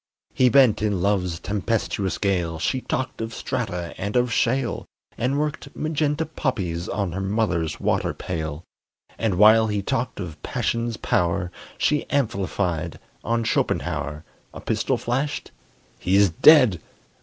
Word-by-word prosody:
He 130 -1 +4
bent 125 -4 +5
in 105 -3 0
love's 90 -3 0
tempestuous 100 -1 -1
gale, 90 -5 0
She 130 +10 -1
talked 130 -2 -3
of 115 +1 -4
strata 90 -8 -3
and 100 +3 -3
of 125 -1 +2
shale, 125 +2 0 0.3
And 130 +4 0
worked 150 0 -3
magenta 155 0 0
poppies 95 - -2
on 100 -3 -1
Her 95 +3 -3
mother's 95 -6 -1
water - - 0
pail; 80 -2 -5 0.6
And 110 -3 +1
while 110 +3 +6
he 105 -2 -1
talked 115 +4 -2
of 85 -5 -7
passion's 115 -1 -2
power, 85 0 0 0.3
She 150 -1 +1
amplified 95 - -1 0.3
on 115 0 0
Schopenhauer 75 - -1 0.3
A - - -6
pistol - - 0
flashed: 135 +5 -2 0.5
he's 95 0 +3
dead! 125 - +6
105 Hz, 130 wpm, -24 LUFS, 90-125 Hz, 0.6 s, while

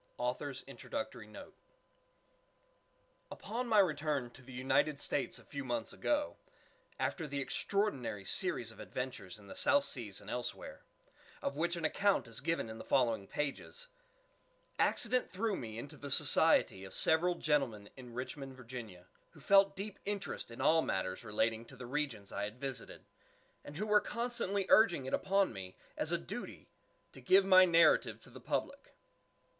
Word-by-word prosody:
GORDON - - -2
PYM - - -7
INTRODUCTORY - - -6
NOTE - - -11 1.8
Upon 235 +5 -4
my 220 -2 +3
return 150 -9 +2
to 130 - -15
the 130 +1 -13
United 130 +3 +1
States 145 - -1
a - - -14
few 140 -1 -5
months 120 -3 -3
ago, 295 0 0 0.6
after 165 -4 -1
the 140 -1 -3
extraordinary 135 - -1
series - - 0
of - - -16
adventure 125 -7 -5
in 105 - -15
the 100 - -9
South 285 -1 +3
Seas 110 -7 -5
and 105 - -15
elsewhere, 125 +2 -5 0.6
of 140 - -1
which 170 +3 0
an 170 -2 -3
account 200 +1 +2
is 115 +2 -7
given 165 -4 -1
in 110 0 -8
the - - -7
following 115 -6 +2
pages, 150 - -4 0.9
accident 255 0 +2
threw 210 +2 -1
me 110 -6 -6
into 140 +5 -8
the 145 - -7
society 140 -7 +4
of 95 -1 -8
several 175 +3 +3
gentlemen 135 -11 0
in 125 -3 -11
Richmond, 135 +1 -5
Va., 115 -8 -8 0.3
who 160 - -15
felt 195 +5 +5
deep 200 +1 -6
interest 200 - -4
in 115 - -10
all 160 +1 +5
matters 95 -7 -2
relating 110 +1 0
to - - -14
the 125 - -7
regions 125 -6 -3
I 100 - -2
had 105 +4 -8
visited, 135 -3 -6 0.6
and 145 - -9
who 210 - -1
were 210 -1 +5
constantly 235 -4 -1
urging 175 -11 +5
it 130 - -5
upon 195 -5 +2
me, 95 -2 -8 0.2
as - - -1
a - - +3
duty, 70 - -8 0.4
to 130 - -13
give 190 +9 +5
my 185 -1 +8
narrative 165 -3 +4
to - - -14
the - - -11
public. - - -3
140 Hz, 165 wpm, -34 LUFS, 115-190 Hz, 1.8 s, my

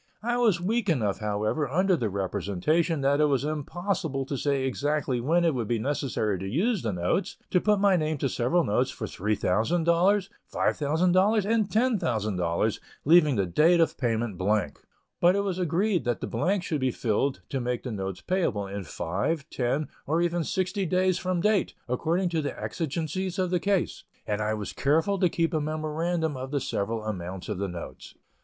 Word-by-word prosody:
I 240 +1 0
was 220 -8 +3
weak 205 +4 0
enough, 110 - +1
however, 105 +7 -1
under 185 +6 +3
the 115 -9 -1
representation 100 - 0
that 140 +2 +2
it - - +5
was 140 -3 +1
impossible 155 0 -2
to 140 - -3
say 140 0 0
exactly 140 -1 -1
when 170 +7 +2
it 165 - +3
would 120 -5 -2
be 120 - +1
necessary 120 -6 -1
to 95 - -5
use 195 - +1
the 110 - -1
notes, 90 - -1
to 180 - +3
put 210 -1 +3
my 200 -1 +4
name 155 -1 -1
to 135 - 0
several 130 +8 +1
notes 125 +3 +1
for 110 - -5
$3,000, 110 - 0
$5,000, 185 +1 +2
and 220 -2 +2
$10,000, 110 - 0 0.3
leaving 155 -2 +6
the 100 -3 +1
date 160 - +4
of 165 - +2
payment 115 -5 -1
blank; 95 -6 0 0.4
but 175 +2 +5
it 200 - +2
was 190 -2 -2
agreed 180 +3 +1
that 120 -2 0
the - - -3
blanks 180 - 0
should 150 -4 -2
be 130 - +2
filled 125 +3 -1
to 135 - -2
make 120 0 -2
the 125 - -4
notes 95 -3 -4
payable 170 - 0
in 100 0 -5
five, 100 - -2
ten, 135 +4 -1 0.2
or 160 +4 +1
even 175 0 +1
sixty 190 +2 -1
days 185 +1 +2
from 185 -2 -1
date, 210 +1 +1
according 165 +9 0
to 165 -2 0
the 145 - -4
exigencies 170 +4 -3
of 185 -2 0
the 180 - +2
case, 195 -1 0 0.2
and 105 0 -1
I 105 +1 0
was 105 -2 -5
careful 165 +8 +1
to 180 -2 +3
keep 165 +1 0
a 155 - +1
memorandum 155 +1 -1
of 130 +1 -5
the 145 0 0
several 110 -2 -2
amounts 95 -3 -5
of - - -3
the 100 - -1
notes. 90 -2 -8
150 Hz, 185 wpm, -27 LUFS, 115-180 Hz, 0.4 s, leaving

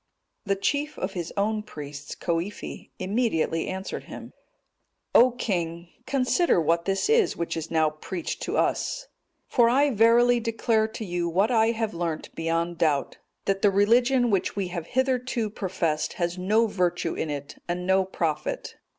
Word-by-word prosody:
The 200 0 +1
chief 285 +9 -1
of 190 +1 -3
his 175 -3 -4
own 215 +2 +1
priests, 145 -8 -8
Coifi, 170 +4 -4
immediately 185 -5 0
answered 190 +1 -5
him, - - -9 0.8
"O 250 +2 +7
king, 170 -8 -3 0.2
consider 270 - +2
what 170 +1 +1
this 195 - 0
is 445 -4 +3
which 170 - -2
is 165 0 -4
now 160 -2 +2
preached 170 +3 -5
to - - -2
us; - - 0 0.4
for 235 -2 +4
I 280 +4 +3
verily 235 +2 +5
declare 225 -1 +1
to 220 0 -7
you 175 -2 -1
what 195 +8 +2
I 225 -2 +4
have 225 -1 -2
learnt 170 -2 -3
beyond 165 +1 -1
doubt, 150 -4 +1 0.3
that 195 0 0
the 205 - +5
religion 240 +5 +3
which 195 -2 0
we 195 -3 -2
have 170 -2 -5
hitherto 255 -4 0
professed 175 -6 -1
has 175 -1 -2
no 210 +5 +2
virtue 180 -5 0
in 160 - -3
it 145 -1 -6
and 180 +1 -2
no 190 +1 +3
profit. 165 -5 -3
195 Hz, 160 wpm, -26 LUFS, 170-230 Hz, 0.8 s, O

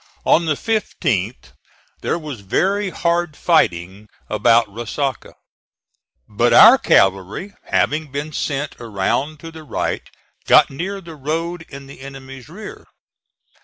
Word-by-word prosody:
On 170 0 +3
the 155 - +2
15th 135 - -2 0.5
there - - -1
was 150 -7 -7
very 190 - 0
hard 170 -3 -1
fighting 95 - +1 0.2
about 115 +2 +4
Resaca; 120 +6 -4 0.9
but 115 +3 +1
our 240 +4 +9
cavalry 95 - +1
having 150 -1 0
been 145 +3 -5
sent 145 +1 -3
around 120 +7 -2
to 165 - -9
the 160 -1 -11
right 155 - -3 0.5
got - - +6
near 190 +8 -5
the 170 -2 -11
road 165 +4 -4
in 140 0 -10
the 135 - -13
enemy's 135 0 -10
rear. 205 +6 -10
145 Hz, 125 wpm, -20 LUFS, 120-170 Hz, 0.9 s, our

